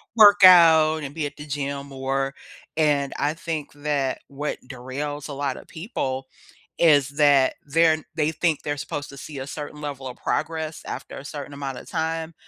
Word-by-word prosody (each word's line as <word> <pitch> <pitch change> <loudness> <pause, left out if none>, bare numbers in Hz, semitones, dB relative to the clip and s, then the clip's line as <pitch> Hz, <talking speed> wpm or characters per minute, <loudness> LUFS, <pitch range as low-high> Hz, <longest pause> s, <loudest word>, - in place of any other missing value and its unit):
work 205 -3 +8
out 160 -3 +7
and 140 - -6
be 155 - -2
at 145 0 -6
the 150 - -9
gym 140 -1 -3
more, 135 0 -2 0.4
and 145 -3 +2
I 145 +1 0
think 160 -3 -5
that 145 -2 -1
what 145 +2 -4
derails 140 +3 -5
a 145 - -6
lotta 140 -1 -3
people 135 - -4 0.5
is 145 -5 +5
that 140 -2 +4
they're 160 +2 +4
n 155 - -4
they 155 0 +1
think 160 -1 0
they're 145 0 -2
supposed 145 0 -5
to 140 - -11
see 145 +1 -8
a 130 - -5
certain 150 0 -7
level 140 -3 -5
of 125 - -8
progress 160 -1 -2
after - - -6
a 135 - -9
certain 145 -1 -7
amount 140 -2 -5
of - - -13
time, 160 0 -2
145 Hz, 185 wpm, -24 LUFS, 140-160 Hz, 0.5 s, work